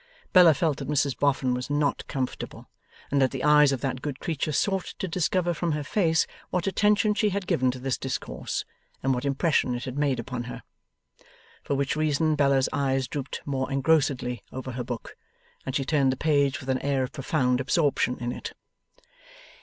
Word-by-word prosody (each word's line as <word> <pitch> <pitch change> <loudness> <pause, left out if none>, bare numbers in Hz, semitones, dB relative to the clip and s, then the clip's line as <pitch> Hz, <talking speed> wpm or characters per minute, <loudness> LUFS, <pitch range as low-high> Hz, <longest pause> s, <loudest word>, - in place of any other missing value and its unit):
Bella 175 -4 +8
felt 155 -1 0
that - - -5
Mrs 145 -2 +1
Boffin 135 -3 +1
was 125 +2 -3
not 145 0 0
comfortable, 130 -3 -4 0.4
and 140 -1 +3
that 130 - +4
the 135 0 -5
eyes 150 -1 +6
of 135 -3 -2
that 130 -2 -2
good 140 -3 -4
creature 155 -2 -2
sought 190 +5 -1
to 190 - -3
discover 175 0 0
from 170 0 -1
her 150 0 -2
face 165 0 +2 0.2
what 180 - -1
attention 210 +2 +3
she 210 0 +2
had 200 -1 -2
given 130 -6 +2
to 125 - -3
this 130 +1 -2
discourse, 130 0 -4 0.4
and 135 0 +2
what 125 +2 -2
impression 140 -2 +1
it 120 - -5
had 130 +2 -4
made 140 -3 +1
upon 125 -2 -4
her. 125 - -8 1.0
For 140 - -2
which 140 +1 0
reason 155 0 +1
Bella's 140 -3 +3
eyes 135 -2 0
drooped 140 +1 -5
more 135 -1 -2
engrossedly 135 -4 +1
over 130 0 -5
her 125 0 -4
book, 120 -1 -6 0.5
and 135 - -2
she 135 - 0
turned 140 -3 +2
the 130 - -3
page 140 -3 +2
with 135 -3 -9
an 130 0 +1
air 140 -2 0
of 130 - -4
profound 130 -3 0
absorption 135 -2 +1
in 120 0 -2
it. - - -6
140 Hz, 190 wpm, -26 LUFS, 130-155 Hz, 1.0 s, Bella